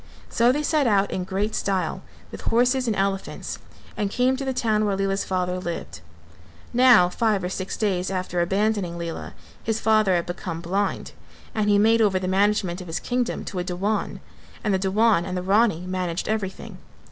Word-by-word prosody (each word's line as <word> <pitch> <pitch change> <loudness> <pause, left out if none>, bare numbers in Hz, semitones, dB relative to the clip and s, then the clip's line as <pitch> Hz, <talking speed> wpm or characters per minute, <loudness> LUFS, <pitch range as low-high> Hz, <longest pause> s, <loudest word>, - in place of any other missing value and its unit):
So 235 +1 +3
they 295 +3 -1
set 300 -3 +2
out 200 -2 +2
in 185 - -2
great 200 +3 -2
style 195 -2 -1 0.3
with - - -8
horses 250 +2 +2
and 220 - +1
elephants 195 0 -2 0.4
and 205 - -1
came 250 +5 +2
to 275 - -4
the 265 - -1
town 220 -4 +1
where 205 -2 +1
Lela's 195 0 0
father 180 -1 -1
lived. 170 - -6 0.7
Now 245 -7 +6
five 210 +1 0
or 180 - -2
six 185 0 -4
days 190 -4 0
after 185 -2 -2
abandoning 195 -1 0
Lela, 170 -1 -6 0.3
his 225 -1 -1
father 215 -4 +3
had 170 - 0
become 175 -1 -5
blind 190 +4 -2 0.4
and, 210 -1 0
he 205 - +5
made 225 +2 +4
over 200 -3 +3
the 185 0 -2
management 195 -1 +1
of 180 - -9
his 165 - -3
kingdom 245 -1 -2
to 190 - -4
a - - -1
Dewan, 195 +4 -2 0.4
and 210 -3 +1
the 190 - +2
Dewan 200 0 +3
and 185 0 -4
the 180 - -3
Rani 200 -2 +3
managed 185 -2 -3
everything. 205 -3 -4
195 Hz, 185 wpm, -24 LUFS, 185-220 Hz, 0.7 s, Now